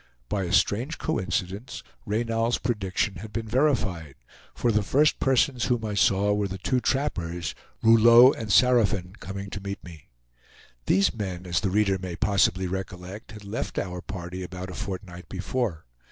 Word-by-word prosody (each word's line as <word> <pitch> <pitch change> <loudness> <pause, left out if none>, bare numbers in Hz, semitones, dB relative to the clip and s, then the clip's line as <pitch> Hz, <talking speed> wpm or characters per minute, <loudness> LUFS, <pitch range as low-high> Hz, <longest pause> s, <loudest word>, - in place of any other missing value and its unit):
By 100 -2 -1
a 85 - -4
strange 125 +10 +1
coincidence, 95 - -3 0.2
Reynal's 115 +2 0
prediction 100 -3 -1
had 105 +4 -9
been 115 0 -4
verified; 105 - 0 0.4
for 120 - +1
the 105 0 +2
first 145 +9 +2
persons 130 -2 +2
whom 120 -3 0
I 105 - -3
saw 100 0 +3
were 105 -1 0
the 95 0 -6
two 125 +7 0
trappers, 90 - -2 0.3
Rouleau 115 +3 +8
and 110 -3 -5
Saraphin, 105 -7 +3
coming 100 +1 -7
to 100 - -5
meet 100 0 -6
me. 85 -4 -12 0.8
These 100 +1 +3
men, 95 -5 -5
as 85 -1 0
the 100 - -1
reader 100 0 +2
may 90 -2 -5
possibly 95 -1 +2
recollect, 95 +3 -6
had 105 -1 -10
left 100 +3 -4
our 90 -1 -3
party 90 -1 -6
about 90 +1 -6
a - - -8
fortnight 90 -2 -7
before. 95 - -3
100 Hz, 160 wpm, -26 LUFS, 90-115 Hz, 0.8 s, Rouleau